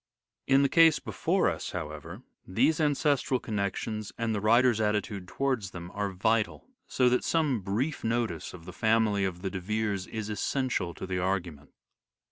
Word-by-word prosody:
In 135 +1 +5
the - - +5
case 165 +1 +6
before - - 0
us, - - -3
however, 80 - -6 0.2
these 155 - +2
ancestral 145 -3 +2
connections 105 0 -3
and 115 -1 -1
the 105 - -2
writer's 115 +1 +4
attitude 105 -3 -1
towards 130 -3 -1
them, 85 0 -8
are 100 -1 -1
vital; 110 +3 0 0.2
so 125 - +2
that 125 - +1
some 150 -7 +1
brief 115 +11 -2
notice 115 -7 -1
of 85 -2 -13
the 90 - -9
family 110 -2 +2
of 90 -1 -4
the 95 - -2
De 95 - -4
Veres 105 0 -2
is 110 -2 -5
essential 105 -4 -1
to - - -6
the 95 -1 -2
argument. 90 -6 -2
105 Hz, 165 wpm, -29 LUFS, 95-125 Hz, 0.2 s, case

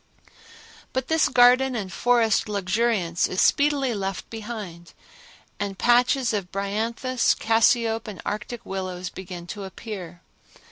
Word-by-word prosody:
But 260 0 -2
this 320 0 +3
garden 250 +1 +5
and 195 -5 -4
forest 230 -2 +2
luxuriance 200 -3 0
is 185 - -3
speedily 280 -3 +3
left 195 -2 -4
behind, 210 -7 -7 0.7
and 200 -1 -3
patches 245 +2 +3
of 195 -4 -3
bryanthus, 225 +6 0
cassiope 225 0 +2
and 200 -5 -7
arctic 230 +3 -5
willows 185 -1 -5
begin 180 -2 -8
to 200 +3 -7
appear. 190 -3 -8
215 Hz, 120 wpm, -24 LUFS, 190-240 Hz, 0.7 s, garden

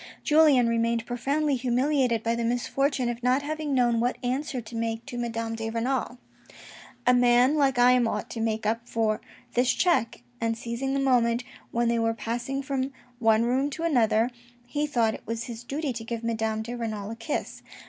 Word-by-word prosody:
Julien 300 -6 +5
remained 230 0 +1
profoundly 280 +5 0
humiliated 250 -1 +1
by 230 - +1
the 235 0 -2
misfortune 250 +2 0
of 240 0 -3
not 255 +3 +2
having 305 -1 -2
known 240 -2 +3
what 245 +2 0
answer 260 +2 -1
to 230 0 -9
make 225 0 -2
to 275 - -8
Madame 230 -1 -3
de 225 0 -3
Renal. 245 +2 -1 0.5
" - - -18
A 250 - +5
man 245 +2 +5
like 275 -4 +2
I 245 +1 +6
am 250 -2 +3
ought - - -2
to 230 - -5
make 220 -1 -1
up 230 +2 -1
for 220 -2 0 0.3
this 245 +1 +3
check! 340 -11 +1
" 245 - -30
and 230 0 0
seizing 240 +4 -3
the - - +1
moment 245 -3 +2 0.3
when 235 0 0
they 235 0 +2
were 225 0 +1
passing 240 +4 -3
from 270 0 -2 0.3
one 225 -1 +4
room 260 +4 +1
to 320 +3 -6
another, 240 -6 +2 0.3
he 295 +4 -2
thought 235 -6 +1
it - - -10
was 230 +1 -3
his 235 -1 -7
duty 280 +2 -3
to 225 -1 -6
give 230 0 -5
Madame 220 -1 -1
de 240 +2 -6
Renal 215 -3 -4
a - - -5
kiss. 230 +6 -4
240 Hz, 200 wpm, -27 LUFS, 230-265 Hz, 0.5 s, I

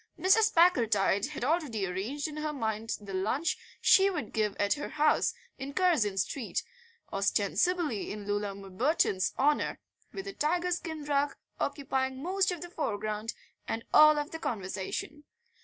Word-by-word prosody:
Mrs. 425 +4 +4
Packletide 225 - +4
had 295 -4 -6
already 280 - 0
arranged 210 - -3
in 305 -1 -8
her 305 0 -2
mind 225 -4 -2
the 200 -2 -9
lunch 235 - 0 0.2
she 390 0 +6
would 345 - -4
give 210 -2 0
at 205 0 +2
her 295 - -5
house 305 +9 +2 0.2
in 275 +2 -6
Curzon 300 - +2
Street, 225 +4 -2 0.5
ostensibly 345 - +1
in 205 -1 -6
Loona 205 -1 -2
Bimberton's 195 - 0
honour, 290 +2 +2 0.3
with 390 - -6
a 395 - -6
tiger 350 +3 0
skin 320 -3 -3
rug 285 0 +1 0.2
occupying 265 -2 -1
most 375 +5 +1
of 350 -3 -5
the 350 - -7
foreground 215 - -3 0.3
and 225 +1 -3
all 305 0 +8
of 295 +1 -2
the 325 - -6
conversation. 205 +7 -4
280 Hz, 150 wpm, -30 LUFS, 210-320 Hz, 0.5 s, all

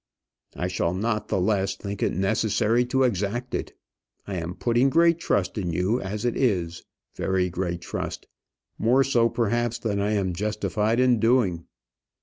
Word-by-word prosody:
"I 90 - -2
shall 90 -1 -1
not 105 +2 -1
the - - 0
less 95 0 +1
think 100 -1 -6
it - - +2
necessary 110 +4 +1
to 130 +2 +1
exact 120 +2 -1
it. - - -4 0.5
I 100 - -6
am 85 +1 -4
putting 120 +3 +2
great 170 +3 +4
trust 100 - 0
in 90 -3 -2
you 95 +8 0
as 100 +3 -4
it 120 - 0
is, 90 -9 0 0.3
very 95 -1 0
great 85 -1 -3
trust; - - -5 0.5
more 125 +4 +4
so 120 -3 +2
perhaps 120 +1 0
than 105 -4 -2
I 105 +2 0
am 95 -3 0
justified 105 +3 -1
in 125 -2 +4
doing." 115 -8 +2
105 Hz, 160 wpm, -25 LUFS, 95-120 Hz, 0.5 s, great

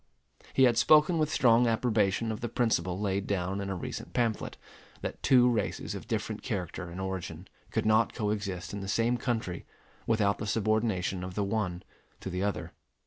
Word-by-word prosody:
He 135 - +4
had 120 -2 +5
spoken 155 +4 +5
with 155 -1 +2
strong 120 -4 +4
approbation 110 -2 +1
of 110 - -5
the 120 - -2
principle 95 -7 0
laid 100 -1 -1
down 95 0 -1
in 100 - -4
a 95 - -2
recent 90 - -6
pamphlet, 115 -3 -1 0.4
that - - -5
two 125 -2 +5
races 120 -3 -1
of - - -7
different - - -2
character 90 -2 -4
and 85 +2 -8
origin 95 -2 -5 0.2
could - - -1
not 110 +1 +4
coexist 105 -5 -2
in 100 - -4
the 95 - -5
same 115 +4 +2
country 115 -9 -2 0.4
without 105 -3 +2
the 105 - -4
subordination 110 -4 0
of 90 0 -6
the 105 - 0
one 100 -4 -2 0.4
to 95 - -6
the 90 +1 -2
other. 100 0 -2
105 Hz, 180 wpm, -29 LUFS, 95-115 Hz, 0.4 s, had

